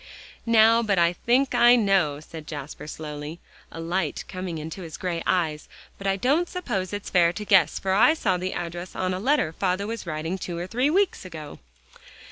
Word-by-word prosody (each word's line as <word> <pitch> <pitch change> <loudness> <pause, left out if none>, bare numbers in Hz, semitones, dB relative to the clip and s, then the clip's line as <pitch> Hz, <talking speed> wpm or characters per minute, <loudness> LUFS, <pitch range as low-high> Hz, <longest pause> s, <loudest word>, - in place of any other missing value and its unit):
"Now 230 0 +5
I 175 -4 +3
think 255 +8 +1
I 240 0 +7
know," 195 -10 +2
said 155 0 -10
Jasper 145 -1 -7
slowly, 150 +1 -7 0.3
a - - -8
light 170 -1 -2
coming 185 -3 -5
into 160 +5 -6
his 165 -3 -8
gray 175 -2 -3
eyes, 160 -4 0 0.3
"but 195 - -4
I 195 - +2
don't 285 - +1
suppose 195 - -3
it's 205 0 -5
fair 170 -2 +4
to 210 +3 -6
guess, 185 -6 +4
for 190 -1 -1
I 225 +11 +5
saw 190 - 0
the 185 +1 -3
address 175 +1 -6
on 185 0 -1
a 185 - -3
letter 250 - +1
father 185 +2 -1
was 225 -3 -5
writing 160 +4 -3
two 175 -1 -5
or 175 - -3
three 250 +8 +1
weeks 385 +4 +1
ago." 160 -5 -9
185 Hz, 190 wpm, -25 LUFS, 165-215 Hz, 0.3 s, I